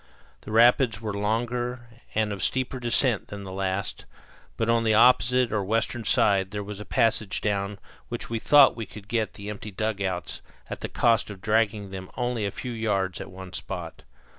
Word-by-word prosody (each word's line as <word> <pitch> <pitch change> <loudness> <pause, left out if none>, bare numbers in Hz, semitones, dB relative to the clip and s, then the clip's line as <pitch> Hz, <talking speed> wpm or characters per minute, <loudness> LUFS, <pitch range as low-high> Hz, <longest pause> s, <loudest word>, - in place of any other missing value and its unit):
The - - -9
rapids 115 0 +5
were 110 -2 -4
longer 120 +4 -1 0.3
and 110 -1 +1
of 100 - -6
steeper 130 0 -1
descent 120 -1 +1
than 100 0 -7
the 95 - -7
last, 95 +1 -3 0.5
but 115 - 0
on 115 0 +3
the 110 -1 +3
opposite 125 +1 +5
or 105 -2 +1
western 115 +3 -1
side 95 -2 +3
there 105 0 -4
was 105 0 -7
a 105 - -7
passage 110 -3 +1
down 100 -1 -1 0.3
which - - -4
we 115 -1 -2
thought 145 +3 +6
we 115 -3 -5
could 105 0 -12
get 110 -1 -1
the 100 +1 -6
empty 105 +1 -7
dugouts 95 -4 -3 0.3
at - - -5
the - - -4
cost 115 -2 +2
of 100 -2 -8
dragging 105 -1 0
them 95 -1 -7
only 120 -4 -1
a - - -1
few 125 +5 -6
yards 100 -5 -1
at - - -7
one 95 -1 -10
spot. - - -6
110 Hz, 190 wpm, -26 LUFS, 100-115 Hz, 0.5 s, thought